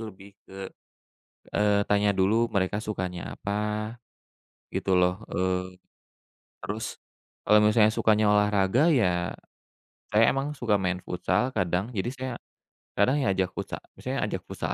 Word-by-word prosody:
lebih 100 -2 -10 0.2
ke, 95 0 -8 0.8
eee, 105 -1 +2
tanya 100 0 +2
dulu 105 +5 +3
mereka 100 -1 0
sukanya 95 -5 -4
apa 105 +3 -3 0.7
gitu 95 - -1
loh, 90 +3 +2
eee, 90 0 -2 0.8
terus 110 +2 -5 0.4
kalau 105 - +5
misalnya 105 0 +5
sukanya 110 -1 +3
olahraga, 105 - +3
ya 90 -8 +1 0.7
saya 105 +2 +4
emang 140 +3 -2
suka 110 -6 +1
main 90 -1 -2
futsal 95 +7 0
kadang, 95 +1 -1
jadi 105 -2 -2
saya 130 0 -4 0.7
kadang 130 +9 +3
ya 130 - +1
ajak 95 -1 0
futsa - - -5 0.2
maksudnya - - -4
ajak - - -4
futsal - - -3
105 Hz, 130 wpm, -27 LUFS, 95-110 Hz, 0.8 s, kalau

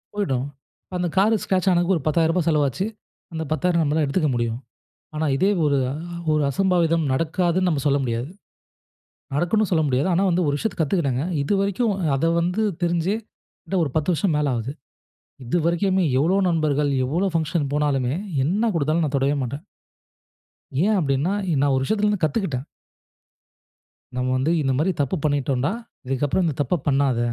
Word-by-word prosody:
போய்டும். 135 -11 -1 0.5
அந்த 180 0 0
கார் 205 +4 +4
ஸ்கெரெட்ச் 190 0 +1
ஆனதுக்கு 175 +1 +2
ஒரு 150 - -7
10000 160 +1 +2
ரூபாய் 180 -3 0
செலவாச்சு. 150 +3 +1 0.5
அந்த 160 0 -3
10000 170 +1 +1
நம்மால 155 +1 +1
எடுத்துக்க 150 +2 0
முடியும். 120 0 -1 0.6
ஆனா, 155 +1 -1
இதே 190 +7 +3 0.2
ஒரு 140 -1 +2
ஆ - - -3 0.4
ஒரு 150 -1 +2
அசம்பாவிதம் 170 0 +2
நடக்காதுனு 170 +5 +1
நம்ம 150 -5 0
சொல்ல 140 0 +3
முடியாது. 120 +2 -2 1.0
நடக்கும்ணு 180 +8 +1
சொல்ல 160 -3 +3
முடியாது. 135 +3 +1
ஆனா, 180 +3 +2
வந்து 180 +1 +1
ஒரு 145 - +1
விஷயத்த 220 +7 -3
கத்துக்கிட்டேங்க. 140 -5 0 0.2
இது 140 - 0
வரைக்கும் 200 +3 0 0.2
அத 135 - 0 0.2
வந்து 180 +6 0 0.2
தெரிஞ்சி 175 +3 +1 0.5
கிட்ட 195 - -3
ஒரு 145 - -2
10 155 +3 +1
வருஷம் 165 0 0
மேல 150 -1 +1
ஆகுது. 120 +3 -3 0.7
இதுவரைக்குமே 175 +7 +1 0.2
எவ்வளவு 180 +8 +2
நண்பர்கள் 150 -4 +1
எவ்வளவு 175 +8 0
ஃபங்சன் 160 -3 0
போனாலுமே 140 -3 +1 0.3
என்ன 210 +9 +1
குடுத்தாலும் 160 +1 +1
நான் 145 -2 -1
தொடவே 140 +2 +1
மாட்டேன். 140 +6 -5 1.2
ஏன் 215 +2 +3
அப்படின்னா, 145 +3 0 0.2
இ - - +1
நான் 140 -1 +3
ஒரு 130 - 0
விஷயத்திலிருந்து 210 0 0
கத்துக்கிட்டேன். 150 - -1 1.5
நம்ம 125 0 -1
வந்து 135 +5 +1
இந்த 135 -2 +1
மாரி 165 +7 +2
தப்பு 140 +6 -1
பண்ணிட்டோம்டா, 140 -1 0 0.3
இதுக்கப்புறம் 135 +7 0
இந்த 155 -4 -1
தப்ப 145 +6 0
பண்ணாத. 135 -3 +2
155 Hz, 155 wpm, -23 LUFS, 140-180 Hz, 1.5 s, கார்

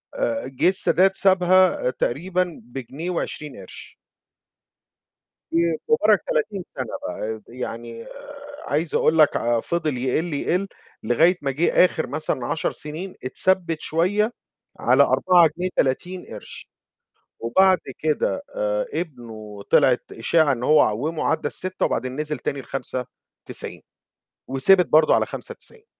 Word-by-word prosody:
آآ، 285 -13 -2
جِه - - +6
السادات 190 0 +3
سابها 185 -6 +3
تقريبًا 175 +8 -2
بجنيه 135 +7 -6
و20 150 -4 -4
قرش. 95 - -12 1.5
ومبارك 170 - +2
30 465 - -1
سَنة 290 - -4
بقى، 110 - -5
يعني 115 -1 -7
آآ، 285 +1 -12
عايز 155 +3 -1
أقول 160 - +3
لك 155 -2 +5
ع 120 0 +1
فضل 155 0 -2
يقل، 140 +7 -1
يقل 180 +7 0 0.4
لغاية 160 +11 +4
ما 140 - -1
جِه 150 +6 +1
آخر 160 -5 -2
مثلًا 145 -2 -3
10 160 - -1
سِنين 160 +6 -7
اتثبِّت 165 +3 0
شوية 205 +9 +1 0.5
على - - +5
4 180 -3 +4
جنيه 185 +1 -1
30 180 +7 -1
قرش 105 - -10 0.7
وبعد 185 +11 +4 0.2
كده 155 - -1
آآ، - - -1
ابنه 110 - -6
طلعت 125 -2 +4
إشاعة 150 +6 +2
إن 120 -2 -4
هو 150 +3 +5
عوّمه 145 +10 0
عدّى 160 -2 0
ال6 185 +4 -2
وبعدين 130 0 -3
نزل 150 -1 -3
تاني 140 +3 -3
ل5.90 125 0 -7 0.7
وثبت 175 +8 +4
برضه 155 0 +5
على - - +2
5.90. 465 -2 -10
160 Hz, 125 wpm, -23 LUFS, 130-185 Hz, 1.5 s, جِه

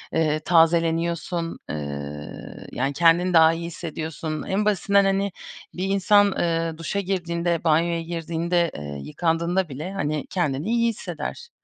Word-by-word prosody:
ııı, 155 -1 +2
tazeleniyorsun, 165 0 +2
ııı, 70 0 -7
yani, 135 +3 -1
kendini 170 +4 +4
daha 160 -1 +7
iyi 170 +1 -4
hissediyorsun. 160 -2 -5
En 200 +2 -1
basitinden 200 0 +3
hani 195 +1 +1 0.4
bir 180 - -4
insan, 200 +1 +4
ııı, 165 -2 -1
duşa 165 +4 -2
girdiğinde, 175 -3 -1
banyoya 165 +1 +2
girdiğinde, 170 +1 -1
ııı, 70 -1 -6
yıkandığında 170 - -1
bile, 155 +8 -6
hani, 150 -5 -2
kendini 155 -1 -1
iyi 235 0 +3
hisseder. 200 - -6
170 Hz, 130 wpm, -24 LUFS, 155-180 Hz, 0.4 s, daha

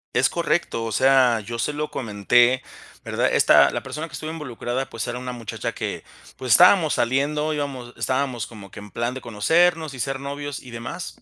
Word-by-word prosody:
Es - - +4
correcto. 115 - -1
O 115 - -4
sea, 130 -1 +4
yo 115 +3 -6
se 150 - 0
lo 150 +1 -4
comenté, 120 +3 +2 0.4
¿verdad? - - 0
Esta - - +6
la - - -4
persona 150 +5 -5
que 150 - -19
estuvo 155 +3 -5
involucrada, 130 -4 -4
pues, 115 -1 -5
era 120 +1 -4
una 125 0 -5
muchacha 115 -3 -5
que, - - -5 0.3
pues, 130 -2 -4
estábamos 175 -1 +6
saliendo, 145 +5 0
íbamos 135 -5 -5
estábamos 130 -4 -1
como 100 -4 -12
que - - -10
en 105 0 -11
plan 120 +4 -2
de 130 - -7
conocernos 160 +7 +2
y 130 - -9
ser 135 +2 -2
novios, 145 +1 -5
y 125 - -12
demás. 120 +10 -7
130 Hz, 195 wpm, -23 LUFS, 120-145 Hz, 0.4 s, Esta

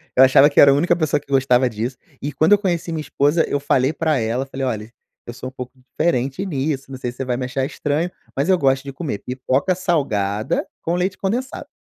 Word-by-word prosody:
Eu 130 - +7
achava 135 +2 +6
que 145 - +1
era 140 - +8
a - - +5
única 170 +5 +2
pessoa 155 -3 0
que 140 - -18
gostava 130 -2 +3
disso, 115 +3 -4 0.2
e 145 - -3
quando 155 +8 +4
eu 205 - +7
conheci 175 -4 -2
minha 160 -1 -2
esposa, 150 +2 +1
eu 145 - -1
falei 140 0 +1
pra 155 -5 0
ela, 115 +4 -1
falei: 135 0 -4
“Olhe, 110 -3 -4 0.3
eu 120 - -7
sou 130 +1 -7
pouco 125 -1 -8
diferente 135 +3 -1
nisso, 140 -4 -3
não 130 - -6
sei 125 -1 -4
se 125 - -19
você 135 - -3
vai 125 -1 -1
me 130 - -3
achar 130 +1 -2
estranho, 150 +5 -2 0.2
mas 140 +7 0
eu 185 - +5
gosto 135 -2 +2
de 140 - -7
comer 135 - -4
pipoca 130 +7 -1
salgada 140 - -1
com 170 +1 -1
leite 185 +1 -1
condensado”. 240 +7 -3
140 Hz, 230 wpm, -20 LUFS, 130-165 Hz, 0.3 s, era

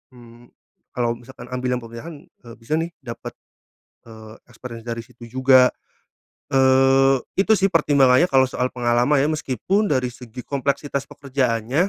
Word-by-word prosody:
mmm, 120 0 -16 0.5
kalau 120 -1 -1
misalkan 120 0 -13
ambil 125 0 -1
yang 125 - -5
pemerintahan, 115 +8 -9
eee, 120 -2 -16
bisa 150 +7 -2
nih 165 +1 -2
dapat, 120 -2 -8 0.7
eee, 110 -1 -13
experience 115 -1 -10
dari 115 -1 -4
situ 120 +1 -15
juga. 130 +1 +4 0.8
Eee, 135 0 +4 0.2
itu 215 +2 +4
sih 195 0 +1
pertimbangannya 145 -1 +4
kalau 135 -5 +4
soal 130 0 -2
pengalaman 120 +3 +1
ya 140 +2 +2
meskipun 155 - -1
dari 125 -5 0
segi 125 0 -11
kompleksitas 140 0 -2
pekerjaannya 130 - -1
130 Hz, 140 wpm, -21 LUFS, 120-140 Hz, 0.8 s, juga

